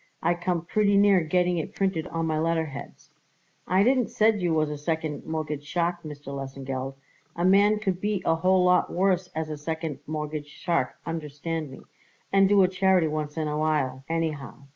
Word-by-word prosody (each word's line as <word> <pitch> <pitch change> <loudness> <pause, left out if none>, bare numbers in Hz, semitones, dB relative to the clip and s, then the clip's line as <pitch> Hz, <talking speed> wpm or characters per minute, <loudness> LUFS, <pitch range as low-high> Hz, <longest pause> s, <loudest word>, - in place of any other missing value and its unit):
I 170 +2 +3
come 175 -1 -2
pretty 205 +2 +2
near 200 -2 +5
getting 180 +2 +1
it 155 - -6
printed 190 -5 0
on 165 0 -2
my 155 -1 0
letterheads." 160 -3 -3 0.6
"I 185 +2 +4
didn't 255 0 +3
said 215 -2 +2
you 175 -1 +1
was 155 -1 +1
a 150 - -4
second 160 -1 -3
mortgage 155 -2 -3
shark, 175 +3 -1
Mr. 145 -3 -8
Lesengeld; 135 -1 -5 0.4
a 175 - 0
man 200 +3 +5
could 190 -4 -2
be 205 -3 -1
a 165 - +4
whole 185 +3 +3
lot 180 0 +3
worse 185 0 +1
as 160 -1 -3
a 150 - -4
second 160 -2 -4
mortgage 150 -1 -4
shark, 155 -2 -1
understand 160 0 -4
me, 130 - -11 0.5
and 195 -1 +5
do 200 -1 +6
a - - +5
charity 185 -3 +2
once 150 0 -4
in 155 -1 -1
awhile, 150 -4 0
anyhow. 155 -5 -3
165 Hz, 180 wpm, -26 LUFS, 150-185 Hz, 0.6 s, do